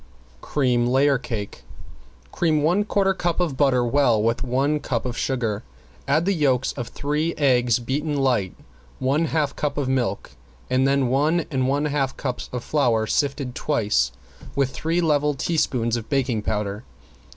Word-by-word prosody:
~CREAM 125 -4 +1
LAYER 135 +1 +3
CAKE~ 115 -5 -6 0.7
Cream 155 -3 +1
one 180 +7 +3
quarter 195 -2 +2
cup 175 -2 -1
of 170 -6 0
butter 130 -3 +3
well 120 -3 +3
with 115 +2 0
one 135 +4 +1
cup 120 -5 -2
of 125 -1 -3
sugar, 115 -7 -1 0.5
add 155 +5 +2
the 200 - +2
yolks 135 -6 +1
of 120 -4 -5
three 150 +3 -2
eggs 125 -5 +3
beaten 145 +5 -2
light, 125 -9 +1 0.4
one 140 +5 +1
half 150 -3 -1
cup 145 -1 -2
of 140 -3 -1
milk, 120 -7 -1 0.4
then 135 0 +2
one 150 +6 +2
and 130 -2 0
one 140 +2 +1
half 140 -3 -1
cups 125 -3 -4
of 125 -1 -4
flour 120 -7 +1
sifted 140 +1 -1
twice 105 - +1 0.4
with 135 -1 +1
three 165 +5 -1
level 150 -3 +2
teaspoons 130 -6 0
of 115 -2 -6
baking 130 -6 0
powder. 105 -1 -3
135 Hz, 155 wpm, -23 LUFS, 120-150 Hz, 0.7 s, LAYER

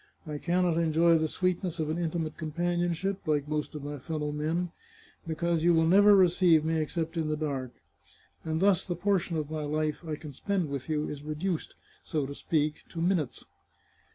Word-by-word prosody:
I 150 -2 -5
can 180 +3 +1
not 170 -2 +2
enjoy 165 0 +4
the 160 - +1
sweetness 180 0 -1
of 155 -1 -1
an 165 - -2
intimate 165 -2 -2
companionship, 175 +4 -1
like 150 -2 +1
most 150 0 -3
of 150 - -6
my 145 0 -5
fellow 150 +1 -3
men, 160 +4 -1 0.6
be 160 - -2
cause 170 0 0
you 175 0 +5
will 160 0 +4
never 205 +4 +7
receive 175 -4 +5
me 160 0 +1
except 165 +2 -3
in 160 -2 0
the 155 0 -1
dark, 135 -5 -3 0.7
and 160 +1 -2
thus 195 -3 +4
the 175 - -3
portion 180 -2 0
of 155 -1 -3
my 155 -1 -2
life 150 +1 -1
I 155 -2 -3
can 150 -1 -9
spend 185 +2 -1
with 140 +1 -5
you 150 -1 0
is 145 -1 -6
reduced, 155 +3 -3 0.3
so 150 -3 -1
to 140 - -6
speak, 150 0 -1
to 165 - -7
minutes." 165 -6 0
160 Hz, 195 wpm, -29 LUFS, 150-175 Hz, 0.7 s, never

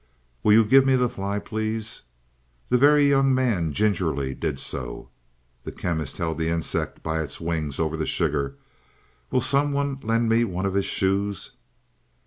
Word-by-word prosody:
"Will 105 - +4
you 110 +1 +6
give 135 +5 +6
me 135 0 +3
the 125 -1 +2
fly, 100 -2 -3
please?" 110 +1 -4 0.7
The 125 - +4
Very 145 +1 +6
Young 135 -1 +3
Man 110 -12 +1
gingerly 80 -8 0
did 75 -1 -3
so. - - -5 0.5
The - - -6
Chemist 80 -5 -3
held 80 -1 -2
the 80 0 0
insect 85 -1 -2
by 80 0 -1
its 70 -3 -6
wings 80 -4 -3
over 80 -1 0
the 80 -1 -3
sugar. 70 -1 -1 0.7
"Will 130 - +1
someone 140 +1 +1
lend 115 +1 +1
me 115 +1 +3
one 95 -3 -2
of 95 - -1
his 100 0 0
shoes?" 100 0 -1
100 Hz, 160 wpm, -24 LUFS, 80-125 Hz, 0.7 s, you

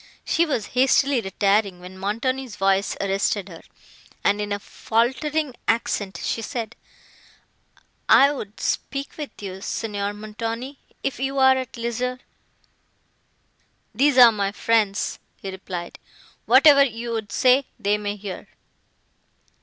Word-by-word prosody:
She 335 +1 +2
was 240 -8 -1
hastily 265 +1 +3
retiring, 195 -1 +1
when 180 +1 -11
Montoni's 230 +5 -2
voice 195 0 +1
arrested 195 0 0
her, 165 -2 -11 0.6
and, 205 +1 +2
in 205 0 -4
a 205 - 0
faultering 265 +8 -1
accent, 205 -3 -1
she 230 - -1
said,—"I 240 +3 -2
would 210 -6 -8
speak 275 0 -3
with 300 -2 -5
you, 190 -1 -6
Signor 205 -1 -3
Montoni, 230 +5 -5 0.2
if 275 - -2
you 270 +1 -2
are 265 0 +6
at 260 -2 -5
leisure." 240 +2 -2 1.8
"These 275 +3 +3
are 245 -2 +10
my 200 -2 -1
friends," 210 -1 0 0.2
he 195 - -7
replied, 185 -2 -7 0.5
"whatever 285 -2 +7
you 235 -2 -3
would 220 -3 -4
say, 255 +5 +3
they 205 +1 +1
may 205 0 -3
hear." 200 -2 -8
225 Hz, 120 wpm, -23 LUFS, 200-260 Hz, 1.8 s, are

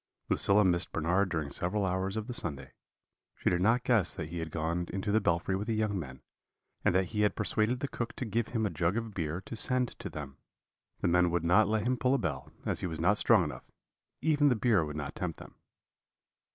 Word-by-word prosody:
"Lucilla 105 +1 +4
missed 85 -2 +1
Bernard 90 +5 +1
during 80 -5 -2
several 100 +6 0
hours 95 +2 -1
of 110 - -2
the 125 - -5
Sunday; 70 - -3 0.7
she - - +1
did 90 0 +1
not 115 +5 +3
guess 110 -8 +2
that 80 -4 -5
he 85 - -4
had 80 -1 -4
gone 85 +2 -2
into 95 +2 -2
the 110 +1 +3
belfry 85 +1 +1
with 100 +3 -3
the 115 - 0
young 105 -3 0
men, 65 -5 -8 0.6
and - - +3
that 95 0 +2
he 105 -2 -1
had 105 - +2
persuaded 110 +4 0
the 140 - -1
cook 120 -3 -4
to 125 - -4
give 115 +1 -1
him 115 -2 -1
a 100 - -1
jug 85 +6 0
of 115 -2 -4
beer 80 -1 -3
to 110 - -8
send 125 +2 +1
to - - -5
them. 70 -2 -8 0.6
The - - +1
men 90 0 +4
would 85 -1 0
not 90 +5 +4
let 110 0 +1
him 125 +1 +1
pull 125 +3 +2
a - - +3
bell, 75 - -3
as - - -1
he - - -2
was 80 -2 -5
not 100 +5 +3
strong 110 -6 +5
enough 75 - -7 0.5
even 145 -2 +4
the 125 - +3
beer 110 -6 +3
would 75 -1 -5
not 75 -2 -4
tempt - - -4
them. - - -12
95 Hz, 230 wpm, -31 LUFS, 85-110 Hz, 0.7 s, strong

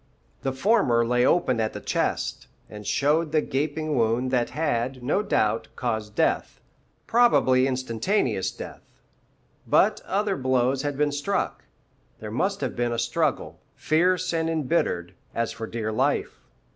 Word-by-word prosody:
The 135 - -1
former 130 - +2
lay 125 +1 +2
open 130 -9 +2
at 110 -1 -1
the - - -5
chest, - - -2 0.2
and 105 -1 -9
showed 150 +3 +1
the 155 -1 +3
gaping 155 +3 -2
wound 120 +2 +1
that 125 -2 +1
had, 130 -4 -2
no 145 +10 +1
doubt, 110 - 0
caused 110 -4 -3
death, - - 0 0.5
probably 135 - +4
instantaneous 130 - 0
death. - - -9 0.9
But - - +3
other 200 0 0
blows 130 0 +1
had 145 -1 -3
been 145 0 +2
struck; 145 +8 -2 0.5
there - - -7
must - - -1
have - - -2
been 120 0 0
a 120 - -2
struggle, 115 - -1 0.2
fierce 180 +3 +1
and 165 0 0
embittered, 150 - 0 0.2
as 115 0 -1
for 110 - -6
dear 110 -1 -3
life. 110 - 0
130 Hz, 145 wpm, -25 LUFS, 115-160 Hz, 0.9 s, probably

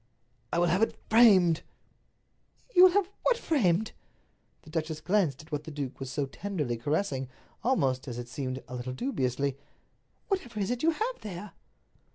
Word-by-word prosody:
"I - - 0
will 175 - +4
have 180 +4 +2
it 225 - +1
framed." 195 -8 +6 1.1
"You 365 +1 +10
will 370 - +7
have 400 -2 +3
what - - +3
framed?" 220 - +1 0.7
The 155 - -14
duchess 160 -1 -2
glanced 175 -8 +1
at 160 - -20
what 150 0 -3
the - - -6
duke 140 -4 -5
was 135 -1 -5
so 140 +3 -1
tenderly 150 -4 -3
caressing, 135 - -1 0.3
almost, 135 - +1
as 120 -2 -5
it 120 0 -5
seemed, 130 0 -4
a - - -9
little 125 +1 -4
dubiously. 135 - -1 0.7
"Whatever 250 - -2
is 195 +2 0
it 245 0 -2
you 325 - +4
have 445 +10 -1
there?" 205 0 -7
170 Hz, 170 wpm, -29 LUFS, 135-220 Hz, 1.1 s, You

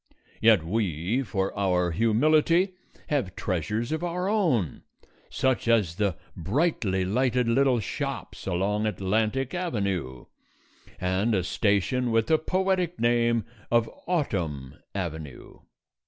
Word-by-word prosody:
Yet 110 -6 +5
we, 95 - 0
for 95 -6 -2
our 90 -3 +1
humility, 155 - +3 0.4
have 130 - -1
treasures 105 - -2
of 160 +2 -2
our 180 +1 -2
own, 165 - +1 0.5
such 130 -3 0
as 105 -8 +2
the 100 -5 0 0.2
brightly 95 - 0
lighted 125 +4 +1
little 130 +1 +3
shops 95 - -5
along 105 +4 0
Atlantic 110 +6 0
Avenue 100 - -2 0.7
and 95 +5 +1
a 95 - +1
station 105 +6 +1
with 115 -1 +2
the 160 -1 +3
poetic 185 0 0
name 120 -1 +2 0.2
of 115 -1 +3 0.2
Autumn 85 - -2 0.2
Avenue. 80 -7 -6
110 Hz, 110 wpm, -26 LUFS, 95-135 Hz, 0.7 s, Yet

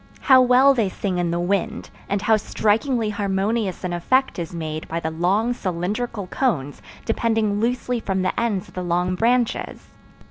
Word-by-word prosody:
How 260 -2 +6
well 255 +2 +5
they 225 -7 +1
sing 185 -1 -3
in 175 -1 0
the 170 +1 -1
wind, 180 +1 -2 0.2
and 200 0 -1
how 220 +1 +4
strikingly 220 +2 0
harmonious 200 0 -1
an 180 -1 -2
effect 255 +7 +1
is 165 -2 -4
made 155 -2 -5
by 165 - -3
the 160 -1 -3
long 195 +9 +1
cylindrical 200 +2 -3
cones, 170 - -2 0.2
depending 225 -2 0
loosely 245 +1 -1
from 190 -3 -2
the 185 - -1
ends 210 -6 -1
of - - -17
the 185 - -4
long 180 +1 0
branches! 235 +4 0
205 Hz, 170 wpm, -22 LUFS, 180-235 Hz, 0.2 s, How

